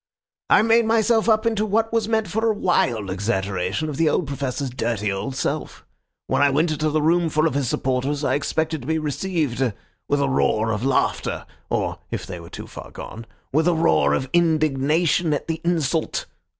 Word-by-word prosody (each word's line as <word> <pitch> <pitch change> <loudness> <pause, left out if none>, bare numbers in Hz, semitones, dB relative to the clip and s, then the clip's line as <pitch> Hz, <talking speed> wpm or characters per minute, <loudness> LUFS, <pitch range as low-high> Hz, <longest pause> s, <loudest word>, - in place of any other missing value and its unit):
I - - +6
made 230 +1 +4
myself 225 0 +3
up 220 +1 +3
into 220 -2 +1
what 225 +2 0
was 225 -2 +1
meant 220 -2 +1
for 220 +5 0
a 215 - +1
wild 120 - +1
exaggeration 95 - -1
of 145 -3 -4
the 160 -1 +3
old 170 - +1
Professor's 140 -1 -3
dirty 110 -5 -1
old 100 +7 -4
self. - - -3 0.4
When - - 0
I 145 - +5
went 155 +4 +2
into 155 0 0
the 155 0 0
room 170 +1 +3
full 155 +1 +1
of 160 - +1
his 140 -3 0
supporters 135 +3 -1
I - - +1
expected 160 +1 -1
to 125 - -10
be 160 0 +1
received 155 -3 -2 0.5
with 145 - +1
a 140 - +2
roar 110 -4 +1
of 105 +1 -2
laughter, 135 0 0 0.2
or - - -1
(if - - -4
they 90 -2 -7
were 85 0 -11
too - - -8
far - - -10
gone) 115 +1 -9 0.3
with 160 +3 +3
a 175 - +3
roar 75 - +3
of 130 - -2
indignation 155 0 +2
at - - -4
the 165 0 -3
insult. 165 -3 0
150 Hz, 195 wpm, -22 LUFS, 130-175 Hz, 0.5 s, I